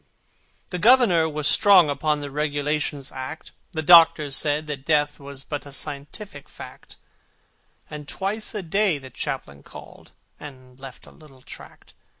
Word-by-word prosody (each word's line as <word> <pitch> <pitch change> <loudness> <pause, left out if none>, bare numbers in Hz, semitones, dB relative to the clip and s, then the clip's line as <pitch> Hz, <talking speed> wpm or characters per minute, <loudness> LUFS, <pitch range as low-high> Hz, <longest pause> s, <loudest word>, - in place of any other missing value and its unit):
The 180 - -3
Governor 210 -8 +4
was 150 -1 -2
strong 190 -3 +5
upon 145 +1 -1
The 145 -1 -7
Regulations 150 -1 -2
Act: 130 +4 -8 0.2
The 160 -1 -3
Doctor 160 -3 +6
said 150 +2 0
that 145 -3 -6
Death 150 0 0
was 140 -1 -9
but 145 0 -6
A - - -11
scientific 145 +4 -7
fact: - - -13 0.9
And 150 -1 -9
twice 210 +6 -4
a 205 - -4
day 190 0 +1
the 130 -2 -12
Chaplain 70 -10 -5
called, - - -14 0.3
And 130 -3 -13
left 135 -2 -12
a - - -16
little 135 -5 -19
tract. - - -14
150 Hz, 150 wpm, -23 LUFS, 140-165 Hz, 0.9 s, Doctor